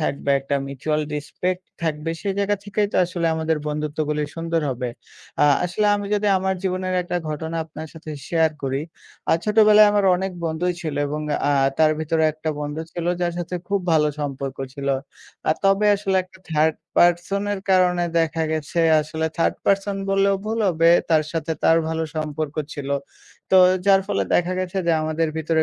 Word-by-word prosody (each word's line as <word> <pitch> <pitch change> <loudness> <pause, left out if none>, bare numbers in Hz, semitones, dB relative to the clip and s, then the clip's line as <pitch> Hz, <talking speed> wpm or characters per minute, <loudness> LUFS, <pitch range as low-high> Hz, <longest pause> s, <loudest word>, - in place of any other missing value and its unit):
থাকবে, 140 -2 -1
একটা 140 +1 -1
mutual 145 +3 -2
respect 180 +5 -3 0.2
থাকবে। 160 0 -2
সেই 195 -1 -1
জায়গা 200 0 +1
থেকেই 205 0 0
তো - - 0
আসলে 175 -1 -2
আমাদের 160 0 0
বন্ধুত্বগুলি 150 0 -2
সুন্দর 165 0 -1
হবে। 125 0 -3 0.5
আ - - +7 0.2
আসলে 195 +4 0
আমি 205 0 -4
যদি 210 0 0
আমার 190 0 0
জীবনের 185 0 -1
একটা 175 0 -3
ঘটনা 160 +2 -4
আপনার 160 0 -8
সাথে 160 -1 -10 0.2
share 160 -2 +2
করি। 135 0 -1 0.5
আ - - +5
"ছোটবেলায় 215 0 +6
আমার 205 -1 +2
অনেক 190 +1 -3
বন্ধুই 165 +2 -1
ছিল" 155 -4 -4
এবং 150 +2 -3 0.3
আ - - +3 0.3
তার 155 -1 +5
ভিতরে 160 +1 0
একটা 155 +1 -4
বন্ধু 145 +2 -4
ছিল 175 -1 -4
যার 175 -1 0
সাথে 175 +1 -4
খুব 200 0 +1
ভালো 150 -1 +4
সম্পর্ক 140 -1 -4 0.2
ছিল। 140 0 -4 0.6
আ - - +5
তবে 195 +2 +4
আসলে 195 -1 0
একটা 185 +1 -19
third 155 0 +2 0.2
person 175 +3 +3
এর 200 - -3
কারণে 180 -1 +3 0.2
দেখা 165 0 0
গেছে, 160 +2 -1 0.2
আসলে 160 +1 -3
third 165 - +2
person 195 0 +1
বললেও 195 0 +3
ভুল 220 +1 -2
হবে। 165 -1 +4 0.2
তার 155 -1 +4
সাথে 165 -1 -2
তার 165 - +6
ভালো 160 0 -1
সম্পর্ক 155 -1 -3 0.2
ছিল। 140 -1 -6 0.6
তো 190 - +6 0.3
যার 195 -1 +6
ফলে 205 - 0
দেখা 175 +1 +2
গেছে 185 +1 -2
যে, 170 - +4
আমাদের 155 +1 0
ভিতরে 160 0 +1
165 Hz, 175 wpm, -22 LUFS, 155-190 Hz, 0.6 s, আ